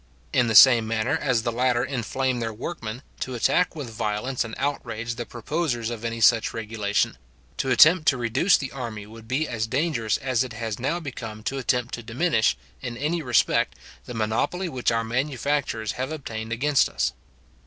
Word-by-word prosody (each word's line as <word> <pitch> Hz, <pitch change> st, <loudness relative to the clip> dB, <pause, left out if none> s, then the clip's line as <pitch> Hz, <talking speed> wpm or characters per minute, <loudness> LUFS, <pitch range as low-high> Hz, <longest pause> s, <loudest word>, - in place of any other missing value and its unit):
In 125 Hz, -2 st, +3 dB
the 110 Hz, -, 0 dB
same 115 Hz, 0 st, +8 dB
manner 110 Hz, +1 st, 0 dB
as 125 Hz, -5 st, 0 dB
the 120 Hz, -, 0 dB
latter 125 Hz, 0 st, +1 dB
inflame 130 Hz, 0 st, -1 dB
their 115 Hz, -1 st, -2 dB
workmen, 115 Hz, 0 st, -6 dB, 0.2 s
to 130 Hz, -, -4 dB
attack 180 Hz, +9 st, +2 dB
with 140 Hz, -7 st, -6 dB
violence 110 Hz, +4 st, -2 dB
and 110 Hz, -1 st, -7 dB
outrage 120 Hz, -5 st, -3 dB
the 120 Hz, 0 st, -6 dB
proposers 120 Hz, -2 st, -2 dB
of 115 Hz, -1 st, -6 dB
any 115 Hz, 0 st, -3 dB
such 115 Hz, 0 st, +4 dB
regulation; 105 Hz, -3 st, -1 dB, 0.4 s
to 130 Hz, -, -1 dB
attempt 155 Hz, +5 st, +6 dB
to 130 Hz, -, +4 dB
reduce 120 Hz, -, +3 dB
the 135 Hz, -, -5 dB
army 115 Hz, -6 st, -6 dB
would 110 Hz, +1 st, -13 dB
be 140 Hz, +6 st, 0 dB
as 110 Hz, -2 st, -2 dB
dangerous 125 Hz, -4 st, 0 dB
as 130 Hz, -2 st, 0 dB
it 125 Hz, -2 st, -7 dB
has 110 Hz, -1 st, -4 dB
now 145 Hz, +8 st, -1 dB
become 115 Hz, -8 st, -7 dB
to 135 Hz, +4 st, -2 dB
attempt 125 Hz, -1 st, 0 dB
to 120 Hz, -, -4 dB
diminish, 120 Hz, -, +1 dB, 0.2 s
in 120 Hz, -1 st, -5 dB
any 155 Hz, +6 st, -1 dB
respect, 125 Hz, -5 st, +2 dB, 0.3 s
the 125 Hz, -, -7 dB
monopoly 110 Hz, -, -1 dB
which 130 Hz, -7 st, 0 dB
our 115 Hz, 0 st, +1 dB
manufacturers 130 Hz, -2 st, -1 dB
have 130 Hz, +4 st, -4 dB
obtained 115 Hz, -7 st, -6 dB
against 135 Hz, +4 st, +2 dB
us. -, -, -1 dB
120 Hz, 180 wpm, -25 LUFS, 115-135 Hz, 0.4 s, same